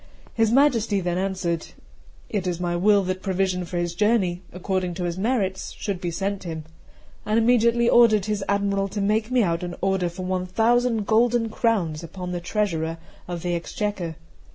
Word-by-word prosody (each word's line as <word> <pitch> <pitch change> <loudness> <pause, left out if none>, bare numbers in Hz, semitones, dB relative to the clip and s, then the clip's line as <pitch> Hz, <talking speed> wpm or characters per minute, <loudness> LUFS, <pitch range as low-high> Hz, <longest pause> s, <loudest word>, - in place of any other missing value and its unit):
His 225 -1 +2
Majesty 235 -6 +3
then 175 -1 -1
answered:'It 185 +1 -5
is 175 -1 -2
my 175 -1 -1
will 200 +3 +4
that 185 0 -3
provision 185 -2 0
for 175 - -5
his 175 -1 -1
journey, 195 -3 +1
according 180 -1 -2
to 180 - -3
his 175 -1 -2
merits, 195 -2 -1
should 195 -4 -3
be 175 - -2
sent 195 +3 -2
him;' 160 -3 -5 0.6
and 215 +1 0
immediately 235 0 +4
ordered 220 -5 +5
his 210 -2 -1
Admiral 200 -1 +1
to 205 +2 -5
make 215 +2 +1
me 255 -2 +3
out 170 -2 0
an 175 -1 -5
order 190 -2 +1
for 180 +2 -7
one 185 0 -1
thousand 230 +2 +2
golden 230 +1 +3
crowns 195 -10 0
upon 180 +2 -6
the 175 -1 -3
treasurer 170 -4 -1 0.3
of 175 -2 -5
the 175 -1 -1
Exchequer. 175 -1 -3
190 Hz, 175 wpm, -24 LUFS, 175-215 Hz, 0.6 s, ordered